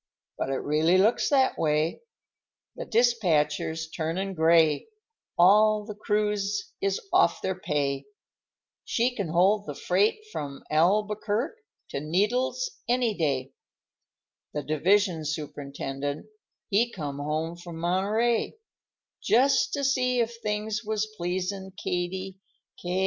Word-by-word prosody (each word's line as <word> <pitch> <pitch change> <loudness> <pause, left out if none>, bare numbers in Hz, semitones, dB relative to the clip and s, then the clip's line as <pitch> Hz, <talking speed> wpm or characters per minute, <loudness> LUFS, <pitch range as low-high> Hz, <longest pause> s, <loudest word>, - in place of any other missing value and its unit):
But - - -3
it 135 - -2
really 155 +5 +3
looks 215 +5 +3
that 270 -2 +3
way, 155 - +1 0.7
The - - -6
dispatcher's 165 -9 +1
turnin' 170 +5 -3
gray, 160 -2 +3 0.5
All 210 +4 +5
the 210 - -6
crews 210 -1 -1
is 195 0 0
off - - +4
their 190 - 0
pay; 140 -4 -1 0.8
She 245 +2 0
can 200 -6 -2
hold 190 +6 +2
the - - -5
freight 430 +1 +1
from 140 - -6
Albuquerq' 210 - +1 0.4
to - - -2
Needles 245 - 0
any 245 -2 +2
day; 135 -6 -1 1.0
The 150 - -2
division 175 +2 +2
superintendent, 145 -1 -4 0.5
he 230 +4 +3
come 145 -7 -5
home 155 +3 -2
from 175 -1 -10
Monterey, 205 +7 +1 0.7
Just 265 +4 +3
to 285 - -1
see 255 -2 +2
if 235 0 0
things 210 +1 -2
was 215 0 -2
pleasin' 185 +1 -3
Katie 185 +2 -3 0.4
Ca—a—a—sey." 180 +1 -1
190 Hz, 115 wpm, -27 LUFS, 155-215 Hz, 1.0 s, All